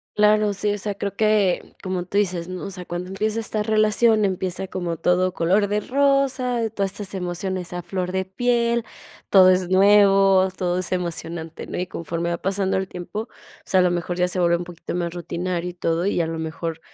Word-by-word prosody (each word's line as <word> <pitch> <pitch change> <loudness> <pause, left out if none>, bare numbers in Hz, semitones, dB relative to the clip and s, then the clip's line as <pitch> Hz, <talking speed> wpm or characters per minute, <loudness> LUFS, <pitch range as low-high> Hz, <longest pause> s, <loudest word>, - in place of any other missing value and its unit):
Claro, 210 0 +4
sí, 205 +1 -1
o - - -3
sea, 205 0 -4
creo 200 0 -3
que 215 -4 +1
como 185 -2 -2
tú 200 +3 -3
dices, 180 -4 0
¿no? 185 -1 -6
O 200 - -5
sea, 180 -1 -7
cuando 175 +2 -5
empieza 215 +3 -1
esta 215 -1 -2
relación, 215 0 +3
empieza 185 -1 -2
como 175 -2 -3
todo 180 +2 +1
color 195 +5 +2
de 210 +1 0
rosa, 265 -2 +1
todas 200 -3 -2
estas 205 -2 -7
emociones 180 0 -3
a 175 - -3
flor 180 +1 -4
de 190 0 0
piel, 235 +3 0 0.4
todo 185 -2 +7
es 185 -1 +3
nuevo, 195 -1 +5
todo 180 0 0
es 185 - -3
emocionante, 170 -2 -4
¿no? - - -5
Y 180 0 -2
conforme 170 0 -4
va 170 - -1
pasando 195 0 0
el 190 0 -2
tiempo, 180 +5 -5
o - - -18 0.4
sea, 185 -1 +3
a - - +4
lo 180 - +3
mejor 175 0 -2
ya 180 0 +2
se 180 - -2
vuelve 170 -1 +3
un 175 - -3
poquito 175 0 -7
más 170 -1 -2
rutinario 175 +1 -3
y - - -17
todo 170 0 -1
y 190 -3 +1
a 160 - -1
lo 165 0 -4
mejor, 160 +1 -4
185 Hz, 215 wpm, -23 LUFS, 175-205 Hz, 0.4 s, todo